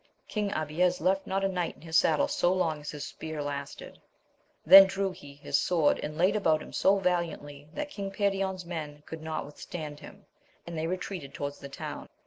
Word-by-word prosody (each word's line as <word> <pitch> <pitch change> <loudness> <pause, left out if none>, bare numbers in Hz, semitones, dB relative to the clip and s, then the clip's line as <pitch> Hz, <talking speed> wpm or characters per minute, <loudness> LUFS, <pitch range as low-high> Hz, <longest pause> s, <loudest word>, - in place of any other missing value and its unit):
King 210 -2 -2
Abies 175 +4 +1
left 190 +1 +1
not 195 +1 0
a - - +3
knight 180 -3 -2
in - - -19
his 160 -1 -5
saddle 155 -3 +4
so 175 - +2
long 165 -5 0
as 150 - -7
his 145 -1 -5
spear 155 -2 -6
lasted; 145 -1 -6 0.6
then 195 +4 +11
drew 195 0 -1
he 145 -5 -12
his 145 - 0
sword, 165 -5 +2
and 150 +1 -5
laid 185 +5 +3
about 160 -7 +3
him - - -12
so 195 +1 +4
valiantly 165 -6 -2
that 295 0 -4
King 200 -5 -4
Perion's 195 -2 -1
men 150 -4 -6
could 160 -1 -8
not 160 0 -3
withstand 150 0 -7
him, - - -13 0.4
and 170 - -7
they 160 0 -1
retreated 180 -4 -5
towards 145 0 -4
the 140 - -9
town. 135 - -7
170 Hz, 195 wpm, -29 LUFS, 150-190 Hz, 0.6 s, then